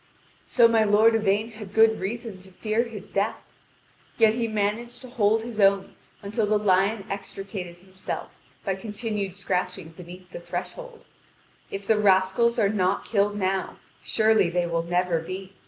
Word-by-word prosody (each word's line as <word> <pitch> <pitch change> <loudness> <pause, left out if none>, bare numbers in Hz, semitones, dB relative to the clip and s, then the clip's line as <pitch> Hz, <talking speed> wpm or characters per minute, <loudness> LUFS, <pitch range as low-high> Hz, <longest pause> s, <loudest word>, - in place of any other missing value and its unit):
So 235 -2 +5
my 225 -1 +3
lord 215 +2 +5
Yvain 215 +1 +1
had 210 -3 -11
good 220 0 +5
reason 215 +1 -5
to 190 - -15
fear 215 +5 -1
his 225 -4 -9
death, 200 +2 0 0.8
yet 220 -2 +5
he 235 0 -1
managed 215 +3 -2
to 255 - -10
hold 220 -2 +2
his 230 -2 -7
own 195 -1 +3 0.3
until 210 +2 -1
the 215 0 +3
lion 195 +1 +2
extricated 195 -2 -6
himself 185 +1 -7 0.3
by 195 - 0
continued 205 -1 -4
scratching 180 -2 -3
beneath 180 +2 -12
the - - -7
threshold. - - -7 0.6
If 195 0 -6
the 215 +1 +2
rascals 195 +4 +3
are 215 -4 +3
not 195 -2 0
killed 205 -1 +1
now, 190 -1 -1 0.2
surely 220 -5 +3
they 175 0 0
will 170 -1 -1
never 175 0 0
be. 185 +3 -7
200 Hz, 155 wpm, -25 LUFS, 190-220 Hz, 0.8 s, So